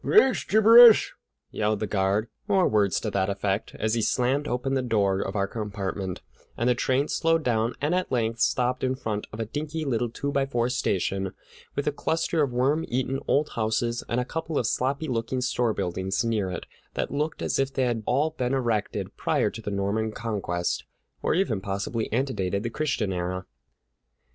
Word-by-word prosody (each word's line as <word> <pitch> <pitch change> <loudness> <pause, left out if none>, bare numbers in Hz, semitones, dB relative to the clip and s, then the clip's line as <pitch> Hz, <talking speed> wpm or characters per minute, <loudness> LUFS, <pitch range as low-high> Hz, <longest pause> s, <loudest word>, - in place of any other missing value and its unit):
"Ax 265 -12 +4
gibberish!" 225 +2 +8 0.4
yelled 105 -1 0
the 110 - -1
guard, 100 +2 +1 0.2
or 195 -3 +3
words 100 -3 +2
to 105 - -3
that 95 0 0
effect, 100 0 -2
as 110 0 -1
he 115 - +1
slammed 130 +6 +1
open 125 +2 -1
the 135 - +2
door 100 -6 +1
of 95 - -4
our 100 -1 +2
compartment, 100 -3 -4 0.3
and 120 - 0
the 125 - +5
train 130 +3 +1
slowed 165 -1 +1
down 115 -1 +1
and 150 +4 0
at 185 0 -1
length 115 -2 0
stopped 125 +2 +1
in 130 0 +1
front 105 -5 -4
of 110 - -8
a 115 - -1
dinky 155 +6 -4
little 120 -3 0
two 140 +5 -3
by 140 -1 +2
four 120 -3 0
station, 95 -5 -1 0.4
with 140 - -1
a 150 - +2
cluster 160 +2 0
of 140 -4 +1
worm 135 +6 +1
eaten 130 +2 -1
old 145 +2 +2
houses 115 +1 -1
and 120 - +1
a 125 - -1
couple 160 +2 -3
of - - +1
sloppy 135 +6 0
looking 120 0 -1
store 125 -2 +1
buildings 95 +4 -2
near 110 -5 0
it 90 - -5 0.3
that - - -2
looked 150 +2 -2
as - - 0
if 135 0 +1
they 135 - 0
had 120 -3 0
all 145 +5 +2
been 130 -3 -1
erected 115 -5 -1
prior - - +1
to 115 - -8
the 105 - -4
Norman 100 +2 -1
Conquest, 100 -7 -2 0.4
or - - +1
even 125 - 0
possibly 100 +4 -3
antedated 105 -6 -1
the 120 - -3
Christian 120 -9 -1
era. 90 +1 -3
120 Hz, 190 wpm, -26 LUFS, 105-135 Hz, 0.4 s, gibberish